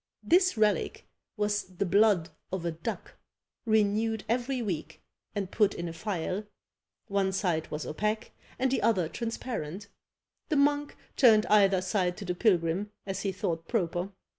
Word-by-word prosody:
This 365 -4 +4
relic 215 -1 +1 0.3
was 210 0 +1
the 185 +1 -4
blood 195 -3 +4 0.2
of 185 -2 -3
a 170 - 0
duck, 160 +1 -6 0.5
renewed 220 0 +2
every 250 +3 0
week, 185 -9 -4 0.4
and 200 -2 -3
put 210 -3 +2
in 170 - -4
a 165 - -5
phial; 185 +1 -3 0.6
one 200 -2 +1
side 175 -5 -1
was 150 -3 -4
opaque, 210 - -2 0.3
and 260 0 +1
the 270 - +1
other 205 -7 +2
transparent; 210 -4 -5 0.6
the 310 - +1
monk 290 0 +2 0.2
turned 220 -4 +6
either 195 -3 +5
side 185 -3 0
to 205 - -7
the 180 - -1
pilgrim, 180 0 +1 0.2
as 195 -1 -3
he 195 - -1
thought 165 -3 -3
proper. 180 -4 -1
200 Hz, 150 wpm, -29 LUFS, 180-220 Hz, 0.6 s, turned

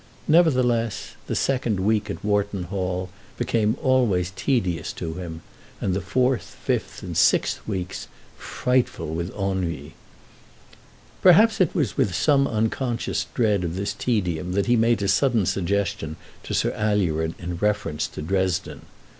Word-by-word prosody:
Nevertheless, 125 - +2 0.2
the - - -2
second 125 -7 0
week 105 +2 +1
at - - -5
Wharton 100 -2 0
Hall 90 0 -3 0.3
became 110 0 +1
always 110 -9 +2
tedious 95 - 0
to 80 - -5
him, 85 -2 -7 0.4
and 95 - -1
the 95 - -1
fourth, 125 +2 0
fifth, - - -2
and - - -5
sixth - - +3
weeks 95 -4 -4 0.3
frightful 125 -10 -1
with 85 +2 -2
ennui. 90 -7 -2 1.3
Perhaps 210 +4 +6
it 175 - +2
was 145 - 0
with 95 -4 +1
some 140 - +3
unconscious 115 +2 -1
dread 105 -6 +2
of 85 0 -3
this 100 +2 -2
tedium 90 -7 -1
that 100 +1 +1
he 120 - +3
made 115 -2 +2
a - - +1
sudden 110 +1 +3
suggestion 95 -4 -1 0.3
to - - -4
Sir - - +1
Alured 85 -7 0
in 85 0 -5
reference 100 -6 0
to - - -8
Dresden. 95 +1 -1
100 Hz, 140 wpm, -24 LUFS, 90-120 Hz, 1.3 s, Perhaps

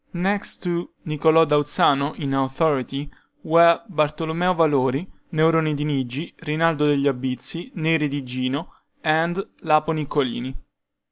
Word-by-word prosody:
Next 195 +3 -1
to 175 -1 -2 0.2
Niccolo 160 +1 +4
da 150 -1 +2
Uzzano 145 0 +2
in 140 -2 -3
authority, 135 +1 0 0.4
were 170 +1 +5
Bartolomeo 160 +1 0
Valori, 145 -1 +2 0.3
Neroni 160 -1 +2
di 145 - -3
Nigi, 140 +1 -3
Rinaldo 155 -1 +1
degli 145 -1 +2
Albizzi, 135 - -3
Neri 160 -3 +1
di 140 0 -4
Gino, 130 +5 -4 0.3
and 170 +4 0
Lapo 155 0 +2
Niccolini. 135 -4 -2
150 Hz, 120 wpm, -22 LUFS, 140-165 Hz, 0.4 s, were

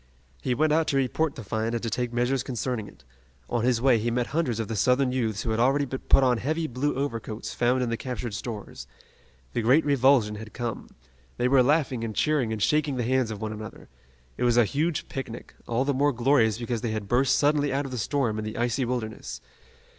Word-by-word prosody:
He 125 - 0
went 155 +2 +2
out 160 0 +2
to 140 - +1
report 140 +3 0
the 115 - -7
find 110 +3 -2
and 115 - -3
to 115 - -1
take 125 -1 -1
measures 125 +2 +1
concerning 120 -3 -3
it. - - -16 0.5
On 120 - 0
his 125 -1 +2
way 125 -2 +4
he 115 +2 -1
met 120 +1 0
hundreds 130 -9 0
of 110 - -2
the 110 - -3
Southern 125 +5 +2
youths 110 -4 -1
who 115 - -2
had 110 - 0
already 135 +4 +3
put 135 +1 +2
on 125 -3 +3
heavy 155 +6 -1
blue 140 +2 -1
overcoats 115 -5 -4
found 125 +1 +1
in 120 - -2
the 115 - -1
captured 125 -3 -5
stores. 105 0 -6 0.7
The 120 - 0
great 130 +8 +4
revulsion 130 -6 +3
had 110 0 -9
come. 120 -4 -4 0.5
They 125 - +2
were 130 0 +5
laughing 135 -3 +1
and 110 -2 -4
cheering 150 -7 +1
and 110 -2 -2
shaking 150 -2 +2
the 125 - -1
hands 130 0 +1
of 110 -1 -6
one 110 0 -3
another. 110 0 -9 0.5
It - - -2
was 120 -1 +3
a 120 - +6
huge 155 +7 -1
picnic, 120 -3 -7
all 120 +3 0
the 140 - +1
more 145 +2 +2
glorious 120 -3 +3
because 120 -1 -3
they 115 -3 -2
had 105 -2 -4
burst 130 +4 +3
suddenly 145 0 +2
out 140 +2 -1
of 135 - -6
the 125 - -3
storm 115 -2 0
and 110 - -4
the 110 - -6
icy 120 +2 0
wilderness. 115 -3 -4
125 Hz, 225 wpm, -26 LUFS, 115-135 Hz, 0.7 s, a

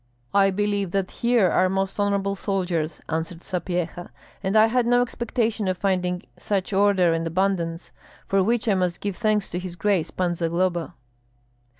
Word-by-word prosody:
"I 195 -1 +5
believe 200 0 0
that 195 -1 0
here 235 -7 +2
are 185 0 +3
most 195 +1 -1
honorable 200 -1 +1
soldiers," 180 -5 -2
answered 165 +1 -4
Sapyeha, 175 -1 -3 0.3
"and 195 +2 +1
I 215 - +8
had 240 +1 +1
no 245 0 +4
expectation 230 -3 -1
of 185 -1 0
finding 180 -2 0 0.2
such 200 -1 -2
order 190 -3 +4
and 165 0 -1
abundance, 170 -1 -1 0.3
for 195 0 +2
which 230 +4 +1
I 210 - +4
must 180 -2 0
give 200 -2 -3
thanks 215 -2 +1
to 175 - -2
his 180 -1 -6
grace 180 -2 +1
Pan 180 -2 -1
Zagloba." 170 0 -1
190 Hz, 165 wpm, -24 LUFS, 175-205 Hz, 0.3 s, I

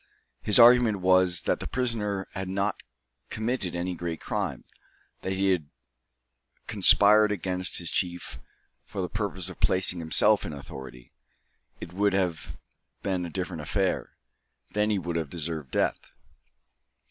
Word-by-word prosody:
His 105 - +1
argument 120 -4 +6
was, 90 -2 +3
that - - 0
the - - -5
prisoner 110 -6 -2
had 95 -1 -5
not 100 +2 -1 0.5
committed 110 -5 -2
any 90 +1 -2
great 85 -1 -5
crime; - - -3 0.6
that - - -4
had 95 - -2
he 95 -4 +2 1.0
conspired 105 +1 +5
against 95 -1 0
his 85 -2 -2
chief 90 -1 -3 0.4
for 95 - -5
the - - -2
purpose 100 -3 -3
of - - -8
placing 90 -1 +2
himself 100 +6 +4
in 80 - -5
authority, 65 -3 -10 0.7
it 85 - -9
would 100 +1 +1
have 85 -7 -2 0.5
been 90 -3 -1
a - - -8
different 90 -1 -4
affair. 95 +5 -1 0.6
Then 105 +1 +1
he 105 - +1
would 85 -2 -3
have 80 -4 -3
deserved 80 -3 -4
death. - - -1
95 Hz, 140 wpm, -27 LUFS, 85-100 Hz, 1.0 s, argument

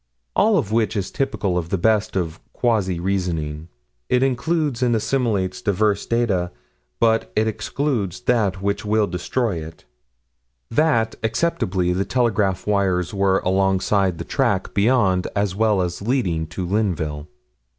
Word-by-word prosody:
All 215 -1 +4
of 105 - -1
which 115 0 +1
is 100 -2 -2
typical 105 -10 -1
of 85 -1 -6
the 95 - 0
best 105 +2 +1
of 85 -3 -2
quasi 105 -8 0
reasoning. 85 -5 -2 0.4
It 125 +1 +3
includes 135 0 0
and 120 -2 +3
assimilates 110 -5 0
diverse 100 0 +1
data: 105 -7 +1 0.5
but 115 -1 +2
it 110 +1 +2
excludes 110 - -2
that 100 -6 +1
which 100 +1 -1
will 105 0 +2
destroy 100 +3 -2
it: 80 +1 -12 0.9
That, 115 -5 +2
acceptably, 110 - 0
the 95 +2 0
telegraph 105 -6 0
wires 95 -4 +1
were 95 -1 +2
alongside 95 0 +1
the - - -5
track - - 0
beyond, 100 -4 +2
as 100 -2 0
well 105 -3 +2
as 90 +1 -4
leading 100 -9 0
to 90 +3 -5
Linville. 80 -7 -1
100 Hz, 140 wpm, -22 LUFS, 90-115 Hz, 0.9 s, All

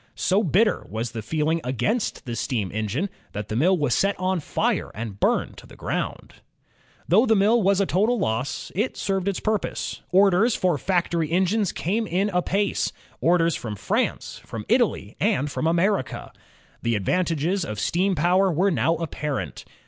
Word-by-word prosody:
So 195 +4 +2
bitter 210 +5 +2
was 110 +2 -3
the 115 -2 -5
feeling 160 +7 0
against 200 - -1
the 120 -2 -4
steam 110 -4 -2
engine 110 - -1 0.3
that 105 0 -5
the 110 - -2
mill 180 +10 +3
was 145 -6 +1
set 200 -1 +1
on 185 0 0
fire 150 - -1
and 105 -2 -6
burned - - +1
to - - -12
the - - -15
groimd. - - -3 0.8
Though 215 +9 +4
the 220 - +4
mill 215 +4 +4
was 195 0 +3
a 200 - +3
total 215 +7 +2
loss, 115 - -2
it 215 +7 -1
served 195 -1 -1
its 200 - 0
purpose. 215 -1 -2
Orders 195 +4 +4
for 175 -6 +1
factory 170 -2 0
engines 190 +2 +2
came 215 +6 -1
in 190 +4 +1
apace, 195 +2 0 0.2
— - - -31
orders 170 -1 +3
from 110 -4 -5
France, 100 - -2
from - - -7
Italy, - - +1
and 140 +2 +1
from 160 - -1
America. 170 -2 0 0.5
The 115 -1 0
advantages 170 - 0
of 105 -1 -5
steam 185 - +1
power 180 +4 +3
were 185 +5 +2
now 165 0 +2
apparent. 150 -3 -4
175 Hz, 170 wpm, -24 LUFS, 140-195 Hz, 0.8 s, Though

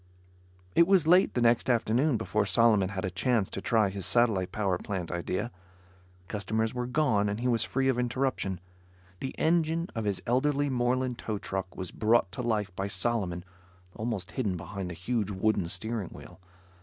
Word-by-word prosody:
It 170 - +5
was 190 -4 +5
late 180 +4 +5
the 125 - +1
next 120 +2 +3
afternoon 120 +3 +2
before 110 -1 0
Solomon 105 -1 +4
had 95 -1 -3
a 90 - -3
chance 110 +1 0
to 95 - -4
try 110 -3 +2
his 95 0 -5
satellite 110 -6 +2
power 95 -4 0
plant 95 -5 -4
idea. 90 +6 -2 0.8
Customers 110 +2 -1
were 125 -1 -3
gone 125 -7 +2
and 105 +2 -3
he 125 - -1
was 115 -3 +2
free 135 0 0
of 130 -2 +2
interruption. 125 -7 -1 0.6
The 130 - -5
engine 165 +1 +1
of 115 -2 -3
his 100 -2 0
elderly 140 +3 +1
Moreland 125 0 0
tow 110 -2 -3
truck 95 -2 -5
was 95 -2 -5
brought 110 -3 +2
to - - -5
life 105 -6 -1
by 95 +2 -2
Solomon 95 -3 -2 0.5
almost 105 -4 -3
hidden 105 -8 -1
behind 95 +2 -6
the 85 - -6
huge 105 +4 -1
wooden 100 -2 0
steering 110 +1 -3
wheel. - - -12
110 Hz, 175 wpm, -29 LUFS, 95-125 Hz, 0.8 s, It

